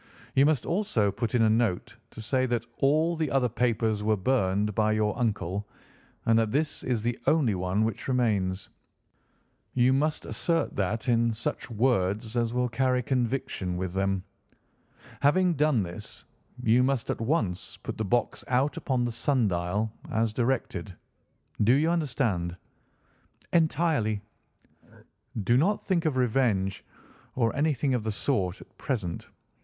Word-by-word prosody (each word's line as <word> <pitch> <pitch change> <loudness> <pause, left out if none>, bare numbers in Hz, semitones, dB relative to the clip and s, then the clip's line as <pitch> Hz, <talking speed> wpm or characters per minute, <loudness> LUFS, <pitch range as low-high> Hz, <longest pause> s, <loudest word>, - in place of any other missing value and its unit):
You 135 +1 +5
must 150 -5 +1
also 165 - +1
put 115 +3 -2
in 115 - +4
a 110 - +4
note 115 0 0
to 110 - -10
say 130 +3 +1
that 120 -2 -1
all 155 +5 +2
the 160 -3 -1
other 135 -2 +2
papers 110 -2 0
were 110 0 +1
burned 105 -2 +1
by 110 +1 +2
your 110 -1 +1
uncle, 105 -4 -2 0.6
and 115 0 +4
that 110 -2 0
this 150 +3 -1
is 120 -4 -1
the 120 +1 -1
only 150 -9 +3
one 95 +3 0
which 110 -2 -4
remains. 105 -7 0 1.1
You 125 +1 +4
must 150 +3 0
assert 165 -1 -1
that 105 +4 -1
in 115 -1 +3
such 110 +2 -4
words 110 -1 0
as 115 -1 +1
will 125 +1 +1
carry 125 +1 +1
conviction 120 -8 -1
with 90 -1 -3
them. 95 -1 0 1.0
Having 175 +5 +3
done 150 -7 +2
this, 85 -1 -9 0.4
you 115 +2 +4
must 130 -2 0
at - - -4
once 110 - -1
put - - -6
the - - 0
box 120 +4 0
out 130 +4 +1
upon 130 -3 0
the 120 - -1
sundial, 110 - 0 0.2
as 110 -1 0
directed. 115 -7 -2 0.7
Do 115 +4 +5
you 155 +5 +3
understand?" 115 - -1 1.0
"Entirely." 155 - +1 1.2
"Do 120 +6 +3
not 195 +9 +2
think 180 -3 -1
of 150 -4 +1
revenge, 110 -6 +1 0.5
or 115 -3 +1
anything 145 -2 +1
of 120 -4 0
the 110 - -1
sort, 100 -5 -1
at - - -17
present. 100 -11 -3
115 Hz, 150 wpm, -27 LUFS, 105-135 Hz, 1.2 s, You